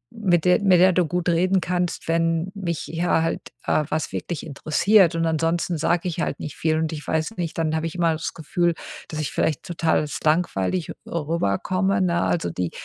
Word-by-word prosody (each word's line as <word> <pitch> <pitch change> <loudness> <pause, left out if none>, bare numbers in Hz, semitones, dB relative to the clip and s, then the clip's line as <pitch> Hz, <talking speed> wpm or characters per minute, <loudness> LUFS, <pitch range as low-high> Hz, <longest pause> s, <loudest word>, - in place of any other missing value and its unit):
mit 180 -6 +1
der 180 +2 +4
mit 185 -3 +5
der 185 0 +6
du 180 -1 +3
gut 180 +2 -2
reden 185 +3 +3
kannst, 180 0 -2
wenn 165 +2 +1
mich 170 -5 -3
ja 165 0 +1
halt, 165 - -1 0.3
äh, 155 - +2
was 155 +1 -2
wirklich 170 -4 -4
interessiert. 165 +5 +3
Und 165 - +1
ansonsten 165 +2 0
sage 170 +3 +1
ich 165 - -3
halt - - -2
nicht 150 - -6
viel 155 -1 +1
und 160 0 -1
ich 150 - -7
weiß 160 +8 -1
nicht 170 -2 -3
dann 160 -1 0
habe 160 +1 -1
ich 165 - -7
immer 170 -2 +2
das 155 - -4
Gefühl, 170 +2 0 0.4
dass 155 - -5
ich 145 - -3
vielleicht 155 - 0
total 165 -2 +1
als 150 -1 -4
langweilig 160 - 0 0.2
rüberkomme, 170 - 0
ne? 170 -2 +1
Also, 165 - 0
die 90 0 -2
165 Hz, 200 wpm, -23 LUFS, 160-180 Hz, 0.4 s, der